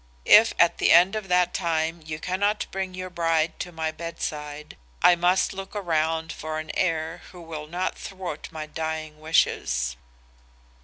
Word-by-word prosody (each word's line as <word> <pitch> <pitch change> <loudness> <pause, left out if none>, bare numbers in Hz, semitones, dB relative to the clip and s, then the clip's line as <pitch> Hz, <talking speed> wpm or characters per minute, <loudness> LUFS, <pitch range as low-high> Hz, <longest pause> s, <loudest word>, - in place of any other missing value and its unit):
If 225 +2 +7
at 170 0 +4
the - - +4
end 180 +4 +6
of 215 -2 -4
that 180 -1 +2
time 165 -1 -1
you 155 0 -5
cannot 200 +5 0
bring 190 -1 -4
your 185 0 -6
bride 165 -2 0
to 175 - -5
my 160 -1 -2
bedside, 150 -2 -6 0.3
I 180 - +8
must 180 +2 +2
look 195 +1 -8
around 160 -3 0
for 155 0 -5
an 155 0 -5
heir 165 -1 -1
who 180 - -12
will 160 -3 -7
not 180 +4 -3
thwart 185 -5 -6
my 155 -1 -5
dying 155 0 -5
wishes. 65 - +1
165 Hz, 160 wpm, -25 LUFS, 155-180 Hz, 0.3 s, I